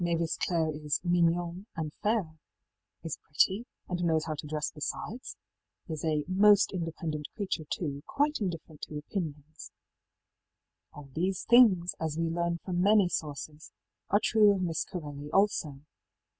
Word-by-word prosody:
ëMavis 170 -1 0
Clareí 160 -3 0
is 150 -1 +1
mignonne 175 +2 +1
and 155 -2 -4
fair, 205 -7 0 0.7
ëis 160 - -4
pretty, 190 +10 +1 0.2
and 175 -1 -2
knows 160 -2 +2
how 160 - -2
to 150 0 -7
dress 150 0 -2
besides,í 180 - -7
is 155 - -5
a 155 -2 +1
ëmost 200 +4 +5
independent 165 -4 -3
creature, 185 -6 -2
too; 145 -5 -3
quite 295 +2 +1
indifferent 165 -5 -4
to 150 - -6
opinions,í 155 -2 -6 1.2
All 145 -2 -12
these 185 +4 -1
things, 205 -8 +6
as 160 -1 -2
we 165 0 0
learn 170 0 0
from 180 -2 -1
many 200 -1 +5
sources, 150 -1 -5 0.4
are 205 - +4
true 215 -1 +5
of 185 - -2
Miss 165 -3 -1
Corelli 145 -4 -7
also. 165 -8 +1
165 Hz, 145 wpm, -30 LUFS, 155-185 Hz, 1.2 s, things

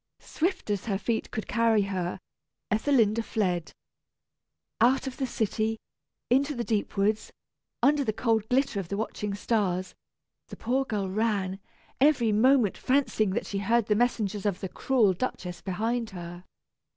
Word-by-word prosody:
Swift 355 - -2
as 200 -2 -2
her 200 -3 +1
feet 225 +2 -2
could 220 - -5
carry 230 -3 +3
her, 185 -2 -3 0.5
Ethelinda 225 -1 +3
fled. 180 -7 -1 1.1
Out 255 +3 +4
of 265 -1 -5
the 265 - -1
city, 220 -1 -1 0.5
into 280 +4 +2
the 240 - -2
deep 215 -3 -2
woods, 210 +2 +1 0.5
under 290 0 +4
the 220 - 0
cold 225 -1 0
glitter 260 -4 +1
of 190 - -5
the 200 - -3
watching 210 -2 -3
stars, 190 -4 -1 0.5
the - - -10
poor 260 +4 0
girl 205 -5 -2
ran, 195 -2 -1 0.4
every 260 -5 +4
moment 235 0 +3
fancying 255 -6 +1
that - - -1
she 200 - -3
heard 225 +3 +2
the 210 - +2
messengers 210 -3 0
of 200 -2 -1
the 190 - -4
cruel 230 -6 +2
Duchess 180 -4 -4
behind 225 +5 -2
her. 175 0 -8
220 Hz, 150 wpm, -28 LUFS, 195-245 Hz, 1.1 s, Out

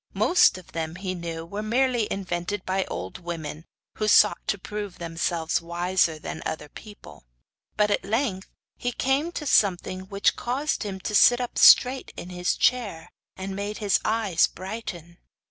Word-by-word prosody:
Most 350 - +4
of 185 - -14
them, 160 0 -4
he 185 0 -4
knew, 165 -2 -6
were 200 +5 -5
merely 240 0 +1
invented 185 +1 -3
by 190 0 0
old 95 - -6
women, 165 -2 -6 0.3
who 215 - 0
sought 210 0 +5
to 205 - 0
prove 205 0 -6
themselves 165 -1 -1
wiser 175 -1 0
than 155 - -7
other 150 -1 -5
people; 205 - -13 0.5
but 210 -1 +3
at - - +1
length 210 -2 -2 0.3
he 245 - -2
came 270 +7 0
to 300 - -5
something 185 -5 +1
which 200 -1 +1
caused 270 +5 -2
him 195 -3 -4
to 210 - -4
sit 240 +4 +6
up 245 -1 -3
straight 260 +1 +6
in 175 - -7
his 180 0 -1
chair, 205 -10 0 0.3
and 190 0 -5
made 205 +1 -4
his 205 -2 +2
eyes 215 -6 +2
brighten. 185 -4 -8
190 Hz, 165 wpm, -25 LUFS, 175-215 Hz, 0.5 s, sit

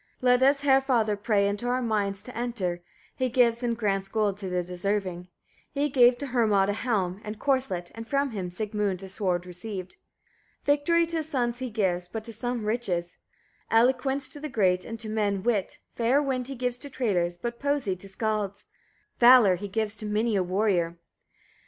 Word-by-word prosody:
2. - - -5
Let 250 0 +5
us 275 +2 +4
Heriafather 265 -6 +3
pray 205 -1 +1
into 205 +4 -2
our 250 +1 +1
minds 205 -3 -1
to 250 - -10
enter, 210 -8 -2 0.3
he 255 -1 0
gives 235 -1 +3
and 235 -2 -1
grants 195 -3 0
gold 210 -2 0
to 195 -2 -5
the 180 0 0
deserving. 180 0 -2 0.4
He 290 0 0
gave 245 -2 +5
to 285 - -5
Hermod 215 -7 +2
a - - +1
helm 205 -5 -1
and 210 0 -6
corslet, 255 -11 0
and 225 0 -8
from 280 0 0
him 190 -5 -4
Sigmund 200 0 -2
a 190 - -8
sword 185 -3 -1
received. 185 +1 -7 0.7
3. 285 - +4
Victory 335 +4 +2
to 330 0 -3
his 315 -1 -3
sons 245 -4 -1
he 260 -1 -3
gives, 185 -5 -1
but 220 +4 -6
to 230 0 -6
some 240 0 -3
riches; 195 -6 -1 0.5
eloquence 260 +4 +2
to 290 - -8
the 305 +1 -5
great, 185 -6 +2
and 225 0 -6
to 225 - -5
men, 205 -3 -1
wit; 215 -5 0 0.2
fair 240 +4 +2
wind 260 -3 -1
he 275 - -6
gives 245 0 -2
to 285 - -9
traders, 180 -10 0
but 235 +5 -5
poesy 280 -9 0
to 195 - -9
skallds; 205 -1 -2 0.5
valour 240 -5 +8
he 205 +3 -6
gives 215 +1 -2
to 215 - -4
many 215 +1 +1
a 195 - +2
warrior. 180 -2 0
220 Hz, 190 wpm, -27 LUFS, 195-250 Hz, 0.7 s, valour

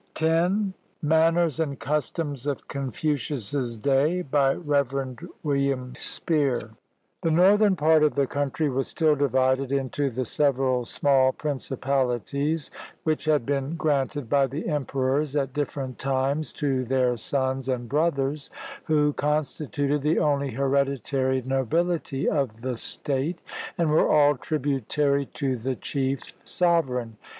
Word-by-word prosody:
V 175 +6 +2 0.3
MANNERS 160 0 +3
AND 140 -4 -2
CUSTOMS 145 -2 -2
OF 140 -2 -3
CONFUCIUS'S 135 -2 -2
DAY 140 +9 +2
BY 135 -2 +2
REV. 140 -4 -1 0.3
WILLIAM 140 -3 0
SPEER 135 -8 -1 0.5
The 165 - +1
northern 195 +5 +5
part 160 -1 +4
of 150 -1 +3
the 140 -1 +2
country 145 +3 -1
was 135 -1 -1
still 155 -2 +2
divided 130 -1 +1
into 140 +1 0
the 130 +1 -3
several 130 -2 +1
small 130 0 +3
principalities 140 - -1 0.3
which 155 0 -1
had 150 -6 +2
been 140 +3 -1
granted 145 -3 0
by 140 +3 +3
the 140 +5 -5
emperors 140 -1 0
at 135 -3 0
different 140 -3 -3
times 135 +3 0
to 135 -3 0
their 125 0 +1
sons 130 +2 -1
and 120 -2 -2
brothers, 145 0 0 0.4
who 150 -2 +2
constituted 150 -1 -1
the 150 +3 +1
only 140 -3 +1
hereditary 135 0 0
nobihty 135 +3 0
of 125 -7 -1
the 130 -1 -2
state, 140 +7 -1 0.4
and 165 -3 +1
were 155 - +4
all 145 -1 +5
tributary 140 0 0
to 135 -3 -2
the 130 +2 -3
chief 135 0 -3
sovereign. 130 -11 0
140 Hz, 125 wpm, -25 LUFS, 130-150 Hz, 0.5 s, northern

